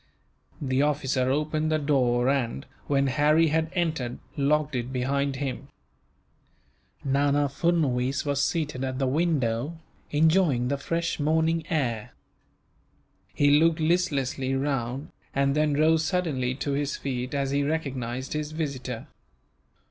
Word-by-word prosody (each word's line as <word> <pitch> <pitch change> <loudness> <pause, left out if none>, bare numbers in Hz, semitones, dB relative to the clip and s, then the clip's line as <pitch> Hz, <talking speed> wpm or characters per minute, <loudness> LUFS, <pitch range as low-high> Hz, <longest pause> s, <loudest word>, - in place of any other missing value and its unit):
The 130 -1 0
officer 135 -3 +1
opened 155 +2 0
the 155 - +3
door 130 -5 +2
and, 125 - 0 0.2
when 140 -1 +2
Harry 150 +4 +3
had 160 +1 +1
entered, 155 -9 -1 0.2
locked 150 +1 +1
it 125 +1 -3
behind 135 +2 0
him. 135 -1 -4 1.4
Nana 140 +1 +2
Furnuwees 140 -4 0
was 140 -1 +1
seated 150 -6 -1
at 130 -1 -2
the 135 - 0
window, 140 -1 0 0.3
enjoying 155 -5 +3
the 140 0 -1
fresh 170 +3 -2
morning 160 +2 +1
air. 120 -9 -1 1.2
He 145 0 +4
looked 165 0 +3
listlessly 140 -6 0
round, 135 -1 -2 0.2
and 140 0 +2
then 150 0 +2
rose 160 +2 +3
suddenly 155 -8 -1
to 140 +1 -3
his 140 0 -1
feet, 125 0 -3
as 135 -1 0
he 140 +1 +1
recognized 135 -4 -3
his 150 0 -3
visitor. 135 -7 -4
140 Hz, 125 wpm, -26 LUFS, 130-155 Hz, 1.4 s, He